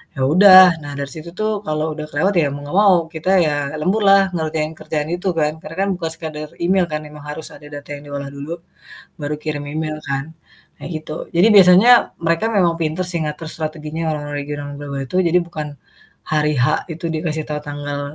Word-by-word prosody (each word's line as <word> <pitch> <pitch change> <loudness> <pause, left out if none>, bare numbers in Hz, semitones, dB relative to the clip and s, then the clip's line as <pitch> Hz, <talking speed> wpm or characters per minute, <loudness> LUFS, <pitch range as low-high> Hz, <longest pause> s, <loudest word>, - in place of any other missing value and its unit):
Ya 135 - -4
udah, 185 +1 +8
nah 145 - -6
dari 140 0 -4
situ 160 +1 -7
tuh 215 +1 -1 0.2
kalau 155 +1 -1
udah 155 0 -6
kelewat 190 +8 +1
ya 145 - +2
mau 145 - -7
nggak 175 +7 -3
mau 190 -2 +7 0.2
kita 160 +4 -3 0.2
ya 150 - +1 0.3
lembur 195 +7 0
lah 195 0 +7
ngerjain 155 -1 -2
kerjaan 155 0 -3
itu 180 +2 -5
kan. 150 0 +1
Karena 165 - -9
kan - - 0
bukan 165 -2 -3
sekedar 155 -2 -7
email 185 0 +3
kan 150 - -1
memang 150 -1 -12
harus 155 +1 -4
ada 150 0 -14
data 145 0 -9
yang 145 - -11
diolah 140 -1 -4
dulu, 140 +3 -8 0.7
baru 145 +1 -2
kirim 150 -1 -4
email 155 -1 -3
kan, 140 +3 -3 0.5
nah - - -7
gitu. 155 0 -6
Jadi 180 +5 +6
biasanya 190 +5 +7 0.3
mereka 170 +6 +1
memang 175 -3 +3
pinter 160 +3 -1
sih 170 - -1
ngatur 150 +2 -5
strateginya 155 0 -4
orang-orang 145 -1 -4
regional, 145 0 -5
orang 140 - -9
global 140 -1 -5
itu. 180 - -4
Jadi 175 -1 +2
bukan 155 -3 -5 0.7
hari 150 0 +2
H 125 +1 +3 0.3
itu 165 +2 -10
dikasih 155 -1 -2
tahu 150 0 -3
tanggal 145 -1 -5
155 Hz, 200 wpm, -19 LUFS, 150-170 Hz, 0.7 s, udah